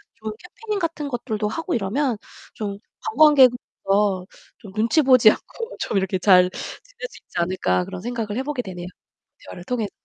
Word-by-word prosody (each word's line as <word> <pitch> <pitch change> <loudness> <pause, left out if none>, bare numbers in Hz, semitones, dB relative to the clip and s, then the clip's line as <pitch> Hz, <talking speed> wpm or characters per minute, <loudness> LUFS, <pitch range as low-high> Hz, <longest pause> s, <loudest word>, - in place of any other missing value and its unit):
좋은 220 0 -6
캠페인같은 360 -6 -4
것들도 220 -4 -2
하고 330 - -3
이러면 235 +4 0 0.4
좀' 200 -2 -4 0.3
관광객으로서 245 - +3 0.3
좀 200 -5 -12
눈치 230 +9 +3
보지 255 -5 +7
않고 460 - -7
좀 205 - -1
이렇게 190 -1 0
잘 180 -2 +6
지낼 - - -8
수 - - -14
있지 - - -11
않을까.' 170 - +1
그런 180 - -7
생각을 225 -1 -3
해 260 - -1
보게 285 -2 -2
되네요 180 -5 -7 0.6
대화를 175 - -9
통해서. 225 -4 -2
225 Hz, 350 characters per minute, -23 LUFS, 195-295 Hz, 0.6 s, 보지